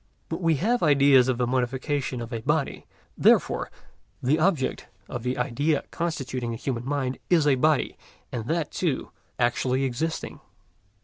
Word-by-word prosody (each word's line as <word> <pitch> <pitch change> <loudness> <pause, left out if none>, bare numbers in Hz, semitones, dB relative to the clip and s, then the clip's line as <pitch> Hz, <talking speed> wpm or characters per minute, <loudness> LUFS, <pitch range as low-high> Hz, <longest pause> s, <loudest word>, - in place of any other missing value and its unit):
But - - -4
we 165 -2 +3
have 230 - +1
ideas 140 -4 +5
of 130 -2 +1
the 125 - +1
modifications 130 +1 -1
of 115 +2 -8
a 115 - -3
body; 150 +3 -1 0.3
therefore - - +3 0.5
the 145 +5 +2
object 160 -6 0 0.2
of 120 - -5
the 125 +2 -2
idea 145 +3 0
constituting 130 -7 -3
the 115 - -3
human 120 -1 -3
mind 135 -2 -1
is 165 -4 +4
a 145 - +5
body, 150 +2 +1 0.3
and 115 -3 -4
that, 165 -1 -1
too, 160 -8 -2 0.3
actually 125 +2 +1
existing. 135 +6 -3
135 Hz, 150 wpm, -26 LUFS, 125-155 Hz, 0.5 s, ideas